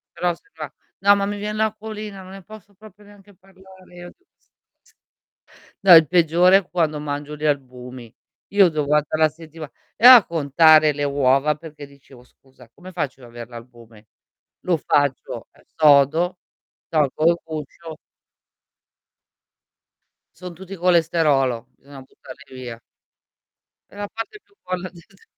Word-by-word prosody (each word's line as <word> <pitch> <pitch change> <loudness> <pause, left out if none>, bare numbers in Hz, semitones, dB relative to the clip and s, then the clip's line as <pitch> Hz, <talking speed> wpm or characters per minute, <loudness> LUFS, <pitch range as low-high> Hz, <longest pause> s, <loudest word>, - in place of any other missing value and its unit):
Però 175 -1 -1
se 410 - -29
va - - -7 0.3
no, 200 +1 +5
ma 200 - -1
mi 205 +1 -4
vien 210 +1 -5
l'acquolina, 215 -2 -5
non 185 0 -13
ne 195 -1 -12
posso 210 0 -15
proprio 210 0 -18
neanche 205 0 -19
parlare 190 -1 -20
io 175 0 -11
di 375 - -41
questa - - -45 1.2
cosa. - - -29
No, 185 -3 +8
il 160 -1 +6
peggiore 175 +2 +4
è 195 - -4
quando 155 -4 -1
mangio 145 0 -6
gli 150 +1 -6
albumi. 125 -4 -4 0.4
Io 195 -4 +5
devo 150 -2 -3
2 145 - -1
volte 150 0 -1
la 155 0 +3
settima 160 -1 -12 0.3
e 235 - 0
a 250 -5 +10
contare 155 0 +4
le 145 0 -4
uova 140 +1 +1
perché 150 -2 -12
dicevo: 135 -3 -19
"Scusa, 130 -1 -22
come 185 +6 -13
faccio 150 -6 -5
ad 120 - -13
avere 120 0 -10
l'albume?" 115 -2 -15 0.5
Lo 175 -2 0
faccio, 145 -2 -2
ehm, - - -25 0.2
sodo, 155 +4 +3 0.5
tolgo 155 -1 -1
il 170 - +1
guscio 160 +1 -9 2.4
Son 180 -1 -10
tutti 190 +2 -10
colesterolo, 160 - +1
bisogna 140 -1 -14
buttarli 130 +1 -15
via. 120 -3 -9 1.1
È - - -17
la 205 0 -5
parte 225 - -8
più 405 - -34
buona 185 0 -5
di 175 - -17
tutte, 195 +3 -25
160 Hz, 155 wpm, -21 LUFS, 140-190 Hz, 2.4 s, a